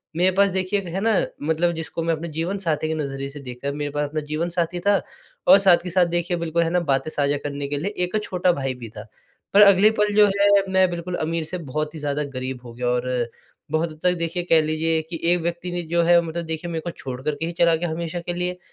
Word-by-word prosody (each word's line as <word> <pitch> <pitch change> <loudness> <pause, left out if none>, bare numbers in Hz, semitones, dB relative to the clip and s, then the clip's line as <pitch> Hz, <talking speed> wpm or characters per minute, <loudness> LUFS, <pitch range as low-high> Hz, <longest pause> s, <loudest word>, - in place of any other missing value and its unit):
मेरे 180 +2 +3
पास 200 0 +4
देखिए, 190 +2 0
है 180 0 -4
ना, 225 0 +2 0.3
मतलब 160 +3 +1
जिसको 160 0 -4
मैं 165 - +1
अपने 160 +1 -4
जीवनसाथी 165 -1 -2
के 160 - -1
नज़रिए 140 -2 -4
से 145 +1 -9
देख 125 -2 -8
कर 140 0 -2
मेरे 145 0 -3
पास 145 0 -2
अपना 155 0 -3
जीवनसाथी 170 +3 -2
था। 200 -1 +4 0.5
और - - +9
साथ 190 -3 +6
के 180 - -5
साथ 180 +1 +3
देखिए 175 +1 -1
बिल्कुल 170 0 0
है 165 - 0
ना 180 +1 +2
बातें 135 +3 +1
साझा 145 -1 +1
करने 140 -1 -4
के 145 - -2
लिए 170 +8 -2 0.2
एक 180 +4 -2
छोटा 180 -2 +1
भाई 135 -4 -2
भी 120 -2 -9
था। 105 - -6 0.5
पर 205 - +7
अगले 200 0 +7
पल 210 0 +2
जो 210 -1 +7
है 200 0 +5 0.2
मैं 190 -1 +4
बिल्कुल 175 +1 -4
अमीर 165 +1 -2
से 180 +3 -5
बहुत 155 +2 -2
ही - - -6
ज़्यादा 145 0 -1
गरीब 130 0 -4
हो 120 - -9
गया 125 +1 -3
और 125 +1 0 0.6
बहुत 160 +1 +1
हद 155 - -13
तक 180 - +4
देखिए 170 +1 -2
कह 165 -1 +6
लीजिए 160 +1 +1
कि 165 - -5
एक 180 - +1
व्यक्ति 170 +1 -3
ने 175 0 -2
जो 170 - +4
है 170 +1 +6
मतलब 170 0 -4
देखिए 160 +2 -4
मेरे 160 -1 -3
को 170 - -5
छोड़ 130 -5 -7
कर 150 +1 -1
के 160 +3 -3
ही 170 - -3
चला 170 -1 +5
गया 170 +1 -2
हमेशा 170 +1 -4
के - - 0
लिए। 180 +1 -3
165 Hz, 255 wpm, -23 LUFS, 150-175 Hz, 0.6 s, और